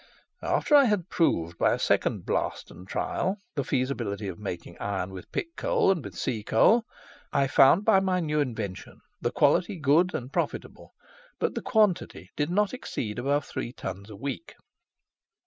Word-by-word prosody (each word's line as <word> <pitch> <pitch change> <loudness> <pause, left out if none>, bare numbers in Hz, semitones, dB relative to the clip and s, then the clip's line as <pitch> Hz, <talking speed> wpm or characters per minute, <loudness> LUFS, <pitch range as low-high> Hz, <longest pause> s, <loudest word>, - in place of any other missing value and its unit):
After - - 0
I 285 -2 +8
had 205 -6 0
proved 85 - 0
by - - +4
a - - 0
second - - 0
blast - - -2
and 90 - -13
trial, 190 - -1 0.2
the 140 -3 -1
feasibility 125 -6 -2
of 90 -3 -6
making 85 -4 -6
iron 95 -2 -3
with 95 -1 -10
pit 335 -1 -4
coal - - +2
and 150 - -3
sea 110 +4 -2
coal, 220 - +4 0.5
I 140 - +2
found 140 +8 +5
by 215 -4 +6
my 190 -1 +1
new 150 -3 0
invention 110 -9 -4 0.2
the - - +1
quality 185 +2 +2
good 160 +5 +3
and 130 -1 -5
profitable, - - -4 0.4
but - - -1
the - - -3
quantity 185 - +1
did 145 +1 -1
not 205 +4 +1
exceed 120 - -4
above 140 +3 0
three 120 - -5
tons 100 -3 -7
a 105 - -9
week." 140 - -6
140 Hz, 165 wpm, -27 LUFS, -, 0.5 s, I